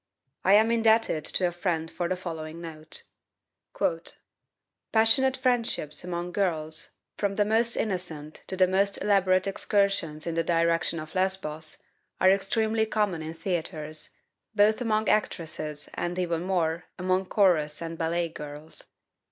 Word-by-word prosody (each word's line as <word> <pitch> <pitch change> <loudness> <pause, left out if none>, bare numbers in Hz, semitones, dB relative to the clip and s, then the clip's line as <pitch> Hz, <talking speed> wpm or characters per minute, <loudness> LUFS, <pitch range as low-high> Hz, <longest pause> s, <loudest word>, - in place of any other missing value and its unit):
I 190 - +5
am 220 +2 +5
indebted 225 -7 +3
to 185 - +1
a - - -2
friend 170 -2 -2
for 175 -1 -2
the 185 - +1
following 165 -3 -6
note: 160 -2 -7 1.9
"Passionate 225 +4 +4
friendships 235 - 0
among 175 0 -4
girls, 160 -5 -2 0.2
from 200 -1 0
the 205 - +3
most 225 +2 +2
innocent 170 -7 -3
to 190 - -4
the 185 - +6
most 195 +2 +1
elaborate 185 -2 +3
excursions 195 -5 0
in 170 - -2
the 165 0 +1
direction 165 0 +1
of 155 0 -8
Lesbos, 185 -5 -2 0.4
are 185 - +6
extremely 220 +3 +1
common 205 -6 0
in 160 +1 -6
theaters, 160 -3 -4 0.5
both 215 +3 +4
among 220 -2 +1
actresses 155 -7 -1
and, 175 +1 -3
even 170 -2 0
more, 170 -2 0
among 185 +1 +1
chorus 165 -8 +3
and 165 0 -5
ballet 170 +1 0
girls. 150 0 -8
180 Hz, 135 wpm, -27 LUFS, 160-200 Hz, 1.9 s, the